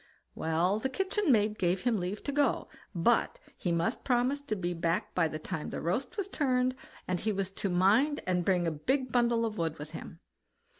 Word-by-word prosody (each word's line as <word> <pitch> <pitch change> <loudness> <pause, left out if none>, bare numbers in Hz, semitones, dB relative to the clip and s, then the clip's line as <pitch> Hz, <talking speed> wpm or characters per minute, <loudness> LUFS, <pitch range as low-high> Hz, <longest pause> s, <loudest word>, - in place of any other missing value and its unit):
Well! 170 +6 +1
the 265 - -1
kitchen 385 +3 +1
maid 215 -2 +2
gave 180 0 +1
him 240 -4 +2
leave 185 +4 -4
to 285 - -2
go, 285 0 +1 0.3
but - - +2 0.2
he 175 - -2
must 170 +8 0
promise 255 +3 +1
to 285 -7 -3
be 175 -3 -2
back 165 +1 -1
by 170 -3 +3
the 155 - -4
time 155 0 -5
the - - -4
roast 215 - -2
was 400 -2 -1
turned, 255 -7 +1 0.3
and 180 -1 0
he 215 - 0
was 195 -1 -2
to 195 0 -3
mind 210 +12 +3
and 180 -1 +1
bring 180 -1 +2
a 165 - +1
big 255 - -1
bundle 235 -1 +3
of 215 -2 -4
wood 165 -1 -1
with 150 +1 -8
him. 165 0 -9
205 Hz, 205 wpm, -30 LUFS, 175-255 Hz, 0.3 s, by